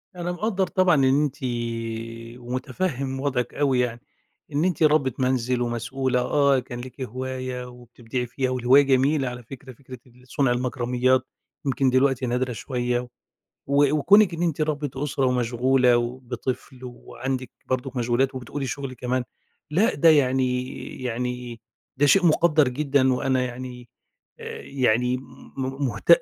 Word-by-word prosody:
أنا 175 0 -3
مقَدّر 195 0 -1
طبعًا 185 -3 +3
إن 135 +2 +3
أنتِ 140 -2 -2 1.0
ومُتفهم 130 +2 -3
وضعِك 130 -4 -1
أوي 135 -3 +1
يعني. 120 -1 -1 0.5
إن 150 +5 +1
أنتِ 170 -3 +1
ربّة 145 -5 +3
منزل 125 -1 +1
ومسؤولة 125 +2 -1
آه، 140 0 +3
كان 120 0 -7
ليكِ 130 +2 -10
هواية 130 +1 -4
وبتبدعي 125 0 -6
فيها، 130 +2 -2
والهواية 130 +2 +5
جميلة 135 +1 +2
على 125 0 -8
فكرة، 130 +1 -11
فكرة 130 0 -12
ال 125 +1 -21
صنع 135 -1 +1
المكرميات 125 +1 +1 0.4
يمكن 135 0 +2
دلوقتي 130 0 +2
نادرة 125 +1 -1
شوية، 125 0 -2 0.6
و 140 +1 +3
وكونِك 195 +4 +5
إن 170 - -3
أنتِ 160 -3 0
ربّة 150 -2 -1
أسرة 135 -2 0
ومشغولة 125 0 +3
وبطفل 125 +1 -4
وعندِك 130 +1 -5 0.2
برضه 130 0 -2
مشغولات 125 +3 +1
وبتقولي 130 +2 -5
شغل 135 0 -5
كمان، 125 +1 -2 0.5
لأ، 195 +9 +2
ده 165 +4 +4
يعني 130 -4 +3 0.4
يعني 125 -1 -4 0.4
ده 145 +2 +3
شيء 180 +4 +5
مقدّر 155 -3 +4
جدًا 135 -1 +2
وأنا 130 0 +1
يعني 125 -1 -7 0.5
آآ، - - -7
يعني 125 -1 +1
م 130 - -9 0.4
م 135 +1 -2
مهت 115 +3 -6
130 Hz, 140 wpm, -24 LUFS, 125-140 Hz, 1.0 s, والهواية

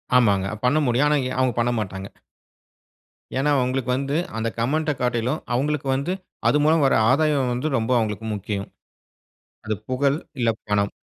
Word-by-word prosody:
ஆமாங்க, 100 -6 +4 0.2
பண்ண 125 +4 +3
முடியும், 125 +5 +3
ஆனா 150 - +3 0.2
அவங்க 130 -2 +2
பண்ணமாட்டாங்க. 105 -5 -2 1.3
ஏனா 145 +2 +1
அவங்களுக்கு 130 0 -1
வந்து, 140 +2 -2 0.2
அந்த 115 +1 -1
கமெண்ட்ட 150 +6 +1
காட்டிலும், 125 +3 0 0.2
அவங்களுக்கு 140 +2 -1
வந்து, 140 +7 -1 0.4
அது - - +3
மூலம் 155 0 +4
வர - - +3 0.2
ஆதாயம் 140 -3 +2
வந்து 125 +5 -2
ரொம்ப 115 +2 -1
அவங்களுக்கு 110 -1 -2
முக்கியம். 100 0 -4 1.0
அது 110 0 -1
புகழ் 140 +2 +1 0.2
இல்ல, 115 -2 +2 0.2
பணம். 100 -1 +1
125 Hz, 140 wpm, -23 LUFS, 110-140 Hz, 1.3 s, ஆமாங்க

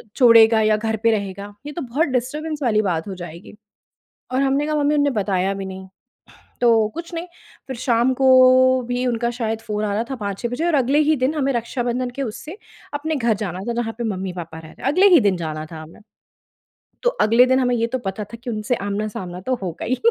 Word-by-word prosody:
छोड़ेगा 230 -3 +6
या 215 0 +3
घर 220 +1 -2
पे 230 - +5
रहेगा? 200 -1 -4
ये 295 - -5
तो 345 - -5
बहुत 275 +6 0
डिस्टर्बेंस 300 +5 -4
वाली 215 -4 +2
बात 175 -5 -2
हो 195 - -5
जाएगी। 175 +2 -10 0.8
और 260 - +1
हमने 275 +2 +1
कहा, 305 - -1
"मम्मी, 295 0 +2
उन्होंने 290 -1 +2
बताया 195 -1 0
भी 195 0 -5
नहीं।" 190 0 -8 0.7
तो 240 - +4 0.3
कुछ 335 +1 -7
नहीं, 335 +1 -4 0.4
फिर 265 - -6
शाम 240 +1 +2
को 265 +1 +1 0.6
भी 245 +1 -1
उनका 235 -1 0
शायद 225 -2 -3
फ़ोन 210 -1 -3
आ 205 - -1
रहा 220 +3 0
था - - -2
5-6 205 +1 -4
बजे 245 +7 -3
और 345 - +1
अगले 275 +1 +2
ही 310 - +4
दिन 260 +3 0
हमें 275 -3 0
रक्षाबंधन 245 +1 -2
के 275 - -2
उससे 275 - -6 0.4
अपने 315 +2 -2
घर 235 -4 +1
जाना 185 -3 -4
था, - - 0
जहाँ 230 -1 -2
पे 240 - -3
मम्मी-पापा 185 -6 -5
रह 160 -1 -11
रहे - - -16
हैं, - - -9
अगले 375 +6 +5
ही 330 - +7
दिन 200 -4 +2
जाना 155 -2 -5
था 160 - -7
हमें। 160 +5 -14 1.0
तो - - +3 0.2
अगले 230 +3 +5
दिन 260 +1 +3
हमें 250 -1 +1
ये 230 0 +1
तो 260 +3 -3
पता 200 +2 -4
था 210 +3 -11
कि 245 - -3
उनसे 215 +2 -1
आमना-सामना 200 -3 -4
तो 260 - +1
होगा 175 -3 -5
ही। 255 - 0
230 Hz, 220 wpm, -21 LUFS, 200-260 Hz, 1.0 s, ही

